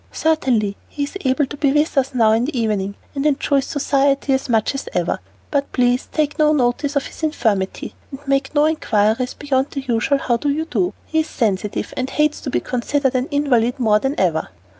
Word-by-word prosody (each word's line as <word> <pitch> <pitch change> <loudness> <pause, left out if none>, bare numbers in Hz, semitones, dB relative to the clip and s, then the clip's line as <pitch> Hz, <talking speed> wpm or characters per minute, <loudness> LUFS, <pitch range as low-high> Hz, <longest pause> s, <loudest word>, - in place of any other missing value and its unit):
"Certainly; 250 -10 +1
he 290 - -3
is 285 - -5
able 265 +3 +2
to 290 +2 -9
be 280 -1 +2
with 300 +3 +1
us 270 -1 +1
now 225 -3 +4
in 225 +2 +2
the 275 -3 -2
evening, 200 -3 -1 0.2
and 275 -2 -2
enjoys 280 -2 +1
society 275 -1 +1
as 265 0 -1
much 225 +2 +2
as 275 - -5
ever. - - 0 0.3
But 280 -1 0
please 245 0 +2
take 300 -1 -1
no 305 0 +4
notice 275 +2 0
of 280 - +1
his - - -10
infirmity, 220 -11 -1 0.2
and 270 - -8
make 275 +1 0
no 295 +1 +5
inquiries 240 -5 +1
beyond 275 -1 0
the 275 - -4
usual 255 +2 +1
'How 245 -3 0
do 290 +5 -1
you 310 +3 0
do.' 200 - -1
He 320 - 0
is 315 - 0
sensitive, 210 -6 -2
and 255 +1 -2
hates 300 +1 +1
to 275 - -4
be - - +1
considered 265 +2 0
an 255 +1 0
invalid 260 -4 +1
more 215 -3 +3
than 270 +5 -2
ever." 165 -4 +1
270 Hz, 205 wpm, -20 LUFS, 235-290 Hz, 0.3 s, no